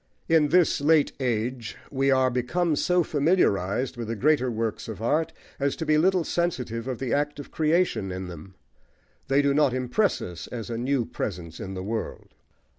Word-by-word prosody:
+ - - -40
In 160 -2 +4
this 170 -1 +3
late 150 0 +4
age 120 -2 -2
we 135 0 +1
are 130 -1 +3
become 150 +7 0
so 180 +4 +2
familiarised 135 - +1
with 115 -2 -4
the 115 - -2
greater 135 +1 +2
works 115 -2 -3
of 110 -3 -6
art 150 +8 +1 0.3
as 140 0 0
to 160 - -4
be 155 0 +3
little 185 +1 +3
sensitive 130 -10 -2
of 130 -2 -3
the 130 -1 -2
act 145 0 0
of 145 - -9
creation 155 - +1
in 95 +1 -5
them: 90 +2 -10 0.7
they 140 +2 +3
do 140 0 +3
not 145 -3 +3
impress 130 - +1
us 90 -2 -7
as 120 -1 -6
a - - -2
new 130 -1 0
presence 85 -7 -5
in 95 0 -6
the 95 - -5
world. 110 +2 -5
130 Hz, 190 wpm, -26 LUFS, 115-155 Hz, 0.7 s, In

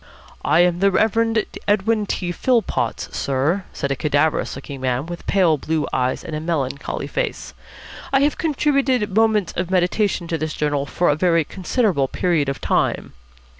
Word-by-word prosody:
"I 155 +4 +4
am 175 -1 +2
the 200 +1 +4
Reverend 225 +2 +2 0.2
Edwin 210 +1 +1
T. 180 -2 -2
Philpotts, 180 - -1
sir," 145 +8 0
said 140 - -3
a - - +1
cadaverous 150 +3 0
looking 140 -2 -8
man 130 +1 -1
with 175 +1 -8
pale 175 -6 +3
blue 155 0 -1
eyes 130 0 0
and 160 - -5
a - - -2
melancholy 140 -4 -3
face. - - -3 0.6
"I 270 - +3
have 290 +1 +1
contributed 275 - +1
'Moments 220 -4 +2
of 180 0 -2
Meditation' 185 0 +1
to 165 - -1
this 155 0 -3
journal 145 -2 -1
for 175 +4 +1
a 145 - +3
very 165 0 +2
considerable 185 - 0
period 160 -2 0
of 135 - -4
time." - - 0
175 Hz, 165 wpm, -21 LUFS, 145-210 Hz, 0.6 s, I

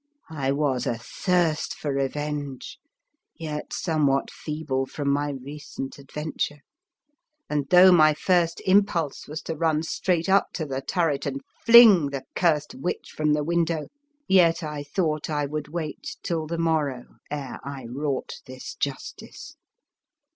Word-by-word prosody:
I 135 -4 -1
was 140 -3 0
athirst 160 +7 0
for 145 -2 -3
revenge, 145 0 -3 0.6
yet 150 -2 -5
somewhat 145 -5 +1
feeble 150 -4 -3
from 140 0 -2
my 145 +1 0
recent 140 0 -7
adventure, 150 +1 -4 0.9
and, 145 -2 -2
though 185 +1 +8
my 155 -3 +6
first 170 -1 +1
impulse 185 -6 +2
was 155 +1 -6
to 165 - -4
run 155 0 +1
straight 170 +1 0
up 195 +1 +3
to 160 - -3
the 135 -2 -3
turret 150 -4 0
and 135 0 -3 0.3
fling 220 -10 +9
the 140 -1 -5
curst 155 -2 +1
witch 350 - -4
from 150 -1 +2
the 150 0 +1
window, 165 -1 0 0.4
yet 170 -2 +4
I 150 -1 -4
thought 155 +1 -1
I 145 -2 0
would 150 +1 -4
wait 155 -1 -5
till 160 -2 -2
the 170 +1 -3
morrow 155 -6 -1
ere 145 -3 -5
I 140 -2 -7
wrought 135 +3 -3
this 130 0 -8
justice. 140 -2 -6
150 Hz, 140 wpm, -25 LUFS, 140-165 Hz, 0.9 s, fling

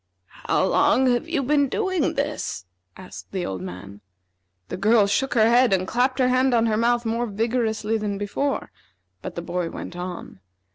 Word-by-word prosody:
"How - - +2
long 265 - +3
have 275 +7 -2
you 310 -5 0
been 285 +1 +2
doing 375 -3 0
this?" 285 - -3 0.3
asked 185 - -11
the 185 -2 -3
old 95 -2 -4
man. 95 +2 -9 0.7
The - - -4
girl 215 +2 +4
shook 255 +7 0
her 220 -1 +5
head 240 +1 +4
and 185 -1 0
clapped 255 +4 +1
her 255 -2 +3
hand 255 0 +3
on 230 -1 +3
her 220 -2 +1
mouth 235 +2 +1
more 230 +2 -1
vigorously 220 0 -1
than 205 -1 -3
before, 235 +8 -2 0.5
but - - -7
the 170 - -5
boy 175 -1 -3
went 175 - -8
on. 180 - -7
230 Hz, 180 wpm, -23 LUFS, 195-255 Hz, 0.7 s, her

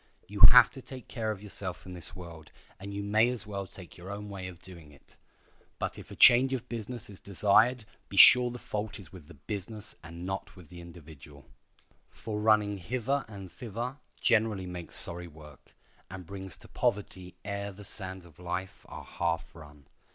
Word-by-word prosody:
You 100 0 -7
have 125 -1 +8
to 135 - -10
take 130 -2 -10
care 110 -2 -3
of 105 -2 -4
yourself 95 -4 -4
in 90 - -8
this 85 -2 -4
world, 85 -4 -11 0.3
and 100 +1 -7
you 100 0 -4
may 110 +3 +3
as 120 -4 -3
well 100 -2 -5
take 90 -2 -10
your 90 +3 -9
own 105 +1 -6
way 95 -2 -6
of 90 -2 -10
doing 85 -5 -13
it. 70 - -21 0.6
But - - -4
if - - -12
a - - -9
change 130 +2 +7
of 125 -3 -3
business 120 +1 -6
is 100 -2 -13
desired 110 +5 +3 0.2
be 100 - -7
sure 125 +6 +9
the 120 - -7
fault 105 -2 -5
is 90 -2 -14
with 85 -6 -12
the 85 - -14
business 105 +1 -6
and 85 +1 -9
not 95 +1 -4
the 90 0 -12
individual. 75 -5 -13 0.6
For 105 -2 -6
running 105 -1 +3
hither 130 +8 -2
and 100 -4 -10
thither 120 +2 -5 0.2
generally 110 -4 +2
makes 90 -2 -6
sorry 85 0 +1
work, 75 -2 -16 0.3
and 95 -1 -8
brings 95 0 -6
to - - -15
poverty 95 -3 -2
ere 100 0 -4
the 100 +2 -12
sands 95 -2 -3
of 80 -2 -18
life 90 +1 -5
are - - -9
half 85 -1 -2
run. 75 -3 -14
100 Hz, 190 wpm, -29 LUFS, 85-110 Hz, 0.6 s, sure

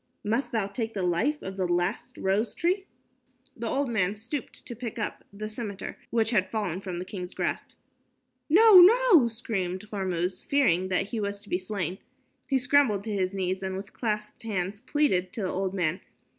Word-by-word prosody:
"Must 230 +6 0
thou 220 -4 +1
take 225 +3 -4
the 195 - -1
life 220 - +1
of 190 0 -6
the 185 -2 0
last 175 0 -1
rose 200 +3 0
tree?" 375 +4 0 0.7
The 230 0 -4
old 275 +4 0
man 205 -4 0
stooped 240 +7 -6
to 240 - -6
pick 235 -1 -6
up 215 - -3
the 210 +2 -6
scimitar 215 -3 -5
which 225 -1 +1
had 190 -5 +2
fallen 195 -5 -2
from 185 -3 -5
the 180 - -4
king's 180 -2 -7
grasp. - - -2 0.8
"No, 405 +4 +9
no," 400 - +7
screamed 210 -4 -3
Hormuz, 185 -3 -2
fearing 185 -11 +2
that 190 +2 0
he 230 - -3
was 200 0 -3
to 205 - -14
be 180 - 0
slain. 185 -2 -3 0.5
He 270 - +3
scrambled 250 -6 +3
to 215 -1 -3
his 185 -2 0
knees 190 -1 -2
and 190 0 -3
with 200 +1 -8
clasped 210 -2 -3
hands 200 -2 -3
pleaded 255 -10 +1
to 220 - -4
the 185 - -1
old 190 +1 -2
man. 175 -1 0
205 Hz, 185 wpm, -27 LUFS, 185-235 Hz, 0.8 s, No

